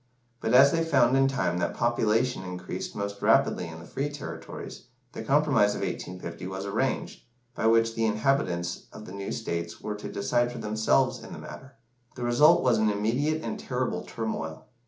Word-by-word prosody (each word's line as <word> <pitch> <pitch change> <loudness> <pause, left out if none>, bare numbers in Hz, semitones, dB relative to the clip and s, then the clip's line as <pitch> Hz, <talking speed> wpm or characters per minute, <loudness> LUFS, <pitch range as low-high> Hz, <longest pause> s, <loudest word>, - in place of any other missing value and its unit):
But 110 - +1
as 140 +2 +8
they 165 0 +1
found 135 -6 +3
in 135 0 +4
time 90 -10 0
that 85 - -1
population 120 0 +1
increased 90 -1 -6
most 100 0 -4
rapidly - - +3
in 80 0 -8
the 85 - -11
free 140 +9 -3
territories, 145 -3 -8 0.2
the - - -6
compromise 135 -8 +3
of - - -4
1850 90 -1 -5
was 95 +1 -5
arranged, 110 +7 -2 0.3
by 110 - 0
which 115 0 +4
the 115 0 +1
inhabitants 105 -8 0
of 105 - -10
the - - -10
new 100 0 -5
states 85 0 -4
were 105 - -4
to 105 - -7
decide 120 +4 +1
for 120 - -7
themselves 110 -10 +1
in - - -9
the - - -7
matter. 135 -1 -10 0.4
The 125 - -5
result 120 +6 +5
was 120 -4 +3
an 110 0 +3
immediate 125 +10 0
and - - -4
terrible 125 -1 -2
turmoil. 95 -9 -5
110 Hz, 180 wpm, -27 LUFS, 100-130 Hz, 0.4 s, as